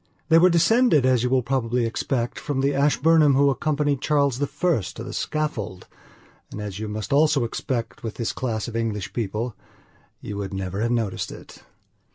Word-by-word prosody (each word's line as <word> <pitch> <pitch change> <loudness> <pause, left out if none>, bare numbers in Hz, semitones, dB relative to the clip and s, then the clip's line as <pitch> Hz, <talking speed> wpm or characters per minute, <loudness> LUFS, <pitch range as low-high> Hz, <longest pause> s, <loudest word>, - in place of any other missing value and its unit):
They 165 0 +7
were 180 +2 +6
descended, 170 - +4
as 130 -2 +3
you 125 - 0
will 130 -1 +2
probably 125 -2 0
expect, 120 +1 -2
from 140 -2 -2
the 140 +1 +1
Ashburnham 150 +1 +4
who 140 +1 +4
accompanied 145 -1 0
Charles 140 -4 +1
I 145 - +1 0.5
to 115 - -6
the 130 - -7
scaffold, 145 -12 -3 0.6
and, - - -7
as 105 -2 -5
you 110 - -4
must 110 +5 -4
also 150 -2 +4
expect 115 0 -3
with 110 -2 -5
this 115 -1 -2
class 115 -4 -3
of 115 - -7
English 110 -5 -2
people, 115 +1 -3 0.6
you 105 - -6
would 100 -1 -4
never 95 +1 -3
have 115 - +1
noticed 115 -5 -1
it. - - -12
125 Hz, 180 wpm, -24 LUFS, 110-145 Hz, 0.6 s, They